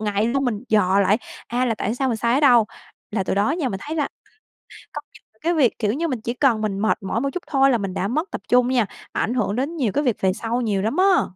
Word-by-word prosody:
ngày 210 -1 0
luôn, 270 +4 0
mình 235 -3 -2
dò 200 -2 +3
lại, 200 +3 +3 0.3
à, 245 +2 0
là 230 - +1
tại 215 +1 -2
sao, 265 +1 -1
mình 235 - 0
sai 235 +2 +1
ở 275 - +2
đâu. 245 -6 +5 0.4
Là 205 -3 -1
từ - - -1
đó 200 +6 +2
nha, 310 -4 -1
mình 190 -3 -5
thấy 310 +2 -5
là 295 -3 0 0.9
có - - -5
những - - -17 0.2
cái 340 +2 +1
việc, 280 -8 +2
kiểu 210 -1 +1
như, 335 +5 -1
mình 255 -7 -3
chỉ 235 +2 -3
cần 250 -4 +2
mình 200 -2 -2
mệt 215 +2 +1
mỏi 205 +4 -1
một 275 - 0
chút 360 - -4
thôi 270 -2 +3
là 245 - +3
mình 195 -4 -4
đã 195 - -1
mất 310 - -2
tập - - -5
trung 245 0 +4
nha, 250 -3 +2 0.3
ảnh 230 - -1
hưởng 215 -5 0
đến 275 +7 -2
nhiều 255 -10 0
cái 290 - +1
việc 245 -7 +1
về 190 -1 +2
sau 230 +4 -2
nhiều 205 -5 0
lắm 220 +7 -1
á! 380 0 +5
235 Hz, 280 wpm, -22 LUFS, 210-275 Hz, 0.9 s, đâu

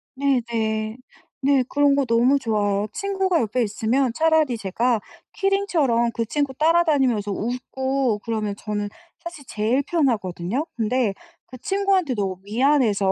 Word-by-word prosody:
네네. 230 -5 -1 0.4
네. 275 -1 +3
그런 285 -1 +3
거 280 - +2
너무 245 +4 +3
좋아요. 210 -3 0
친구가 385 -3 0
옆에 230 +2 -1
있으면 230 +4 0
차라리 315 -5 +2
제가 225 +4 0 0.3
키링처럼 335 - +1
그 230 - -1
친구 285 +3 -1
따라다니면서 285 -9 +2
웃고 250 +1 -1
그러면 215 -3 -2
저는 205 -1 -3 0.3
사실 335 -5 -9
제일 225 +6 0
편하거든요. 235 - -1
근데 230 -1 0 0.3
그 255 - -11
친구한테 390 -6 +1
너무 190 -3 -2
미안해서 220 -3 +2
250 Hz, 300 characters per minute, -23 LUFS, 215-285 Hz, 0.4 s, 네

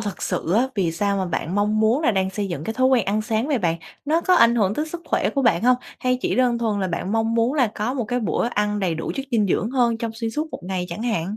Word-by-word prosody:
thật 205 -3 -5
sự 175 -2 -2
á, 245 +5 +3
vì 175 -5 0
sao 200 +3 0
mà 190 - 0
bạn 175 0 -3
mong 210 +1 +1
muốn 230 +8 +2
là 265 - +3
đang 190 -2 0
xây 200 0 -3
dựng 160 -3 -5
cái 225 - -3
thói 255 0 +3
quen 260 -2 +3
ăn 210 +2 0
sáng 225 +2 -1
vậy 280 -5 +1
bạn? 170 -4 0 0.3
Nó 315 +3 +2
có 365 +2 +3
ảnh 235 -8 +5
hưởng 205 -3 +1
tới 305 +1 -2
sức 345 +1 -6
khỏe - - 0
của 275 - -1
bạn 230 -8 +3
hông? 250 +1 +5 0.2
Hay 255 0 +1
chỉ - - 0
đơn 245 -2 +2
thuần 215 -4 -1
là 190 - -1
bạn 180 +3 -3
mong 225 0 +1
muốn 230 +4 +2
là 265 -6 +3
có 225 +5 -2
một 245 - -1
cái 245 +3 -2
bữa 210 0 0
ăn 210 -2 -1
đầy 175 -4 0
đủ 160 - -4
chất 270 0 -4
dinh 220 -4 +2
dưỡng 200 +4 0
hơn 240 -3 +2
trong 230 -1 -3
xuyên 225 -1 -3
suốt 305 +5 -3
một - - -7
ngày 180 -1 -3
chẳng 170 +7 -5
hạn? 210 -3 -2
220 Hz, 300 wpm, -22 LUFS, 195-245 Hz, 0.3 s, ảnh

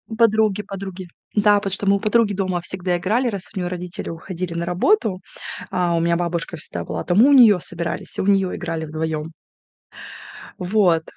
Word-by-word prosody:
Подруги, 220 -3 +3
подруги. 190 -2 -7 0.3
Да, 210 0 +5
потому 200 -1 -2
что 200 - -3
мы 200 0 +4
у - - -6
подруги 215 0 +2
дома 185 -2 -1
всегда 180 0 -2
играли, 225 +8 +1
раз 200 -5 -4
у 190 - -4
нее 175 - -2
родители 180 0 -5
уходили 170 +1 -5
на 170 0 -2
работу. 190 - +1 0.5
А, 175 -2 0
у - - +2
меня 170 0 +2
бабушка 170 0 -2
всегда 155 - -5
была, - - -4
то 175 - 0
мы 235 +7 +7
у 285 - +5
нее 220 -8 +7
собирались, 170 0 -5
у - - -1
нее 195 -2 +2
играли 160 -1 -4
вдвоем. 155 0 -4 1.3
Вот. 180 -3 +2
185 Hz, 185 wpm, -21 LUFS, 170-205 Hz, 1.3 s, мы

